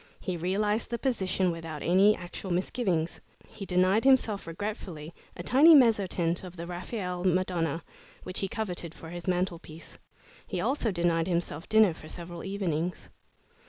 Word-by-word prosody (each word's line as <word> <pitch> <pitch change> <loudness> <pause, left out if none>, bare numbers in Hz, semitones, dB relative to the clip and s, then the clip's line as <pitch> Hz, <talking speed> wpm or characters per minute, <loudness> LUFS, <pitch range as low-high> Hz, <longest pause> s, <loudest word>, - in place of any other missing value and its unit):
He 185 - -3
realized 205 +6 0
the 235 - -2
position 190 -8 0
without 165 -2 -6
any 195 +4 +5
actual 180 +2 -7
misgivings. 180 -2 -1 0.3
He 195 -3 -9
denied 185 +4 +3
himself 250 -8 +3
regretfully 170 -3 -6 0.2
a 175 - -5
tiny 300 - +7
mezzotint 195 - +3
of 180 -1 -9
the 170 - -5
Raphael 180 0 -4
"Madonna," 175 -3 0 0.4
which 185 - -4
he 195 - -1
coveted 185 -7 -4
for 160 - -10
his 175 +1 -8
mantelpiece. 175 -3 -3 0.5
He 180 - -3
also 240 +4 0
denied 170 -3 +1
himself 170 -2 -2
dinner 220 -5 +5
for 155 -1 -12
several 170 -1 -7
evenings. 180 -4 -3
180 Hz, 145 wpm, -29 LUFS, 170-205 Hz, 0.5 s, tiny